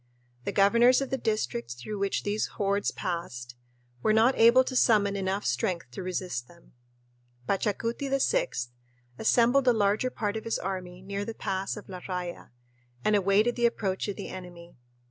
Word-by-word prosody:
The - - -1
governors 235 +5 +5
of 275 - -4
the 265 - +1
districts 120 - -2
through 200 +12 -6
which 200 0 -1
these 205 +1 -1
hordes 200 0 +1
passed 125 -9 -5 0.5
were 215 - +3
not 230 +4 +4
able 235 +3 +6
to 255 - -5
summon 205 -5 +4
enough 195 +1 -2
strength 175 - -1
to 125 - -6
resist 180 -9 -3
them. 170 -1 -20 0.8
Pachacuti 230 +7 -1
VI 470 - +2 0.7
assembled 245 +4 +4
the 250 - +5
larger 210 +3 +1
part 210 -4 -3
of 220 - -5
his 230 - 0
army 185 -1 -5
near 200 +1 -3
the 225 +2 -6
pass 190 +2 -3
of 210 - -10
La 185 -2 -7
Raya 180 -1 -5 0.6
and 215 - +4
awaited 205 +4 +3
the 240 -1 +3
approach 195 -5 -2
of 205 - -3
the - - -7
enemy. 175 -2 -10
200 Hz, 165 wpm, -28 LUFS, 185-230 Hz, 0.8 s, able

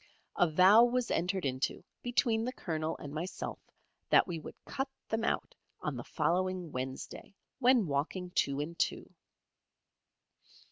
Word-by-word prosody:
A 175 - +4
vow 185 +8 +7
was 245 0 +1
entered 180 +1 0
into 130 0 -1 0.2
between 235 -2 +1
the 250 - -1
Colonel 160 -9 -3
and 145 -1 -8
myself 170 +5 -4 0.5
that - - +6
we 170 -3 -3
would - - -9
cut 270 0 -3 0.2
them 225 0 0
out - - -1 0.3
on - - -3
the - - -5
following 185 -1 0
Wednesday, 130 +8 -6 0.2
when 250 -4 +5
walking 165 +5 -2
two 140 -4 +1
and 165 +3 -4
two. - - -1
180 Hz, 140 wpm, -32 LUFS, 155-225 Hz, 0.5 s, vow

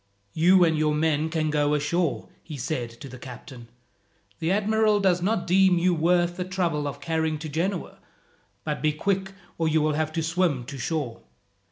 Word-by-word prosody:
"You 180 +3 +5
and 160 -1 +2
your 155 -1 +1
men 155 0 +1
can 155 -1 -1
go 150 0 +2
ashore," 160 +3 -1
he 155 -3 -8
said 125 -2 -3
to - - -7
the 130 -1 -10
captain. 125 -1 -10 0.7
"The 165 +2 0
admiral 215 +1 +2
does 185 -3 +2
not 195 0 0
deem 185 0 +4
you 180 +1 +2
worth 175 +1 +2
the 180 - -1
trouble 175 -5 -1
of 140 0 -6
carrying 160 +1 -1
to 155 +1 -7
Genoa; 175 +5 -3 0.6
but 150 -1 -3
be 155 -1 +2
quick, 190 +4 -1 0.3
or 165 - +1
you 160 0 +3
will 155 0 +1
have 155 +1 -1
to 165 -1 -1
swim 165 -5 0
to 135 +2 -8
shore." 145 -4 -3
160 Hz, 185 wpm, -25 LUFS, 150-180 Hz, 0.7 s, You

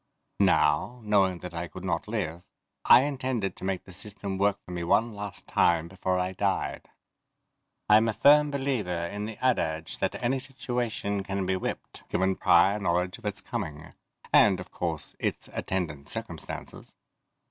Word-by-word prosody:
Now, 75 +11 +3
knowing 100 -4 +3
that 90 -1 -7
I 85 +1 -4
could 95 +1 -10
not 85 0 -1
live, 90 -7 -3 0.4
I - - +9
intended 130 -7 -2
to - - -12
make 95 -1 -2
the - - -13
system 100 +1 -4
work 100 0 +3
for - - -10
me 90 -1 -3
one 110 +7 +2
last 105 -1 -6
time 85 -1 +2
before 95 0 -1
I 90 0 0
died. 95 +1 -2 1.0
I'm 110 +2 +6
a - - 0
firm 150 +5 +6
believer 120 -12 -1
in 105 +4 -4
the 110 -1 -7
adage 80 -10 0
that - - 0
any 130 +3 +1
situation 120 -6 -3
can 95 -1 -2
be 95 +1 +1
whipped, 95 - -5
given 95 +1 +1
prior 95 +5 +4
knowledge 90 +1 0
of 115 - -16
its 105 - -4
coming 75 -1 -5 0.4
and, - - +6
of - - -9
course, 80 -4 -4
its - - -2
attendant 75 -6 -3
circumstances. - - -7
95 Hz, 160 wpm, -28 LUFS, 85-110 Hz, 1.0 s, I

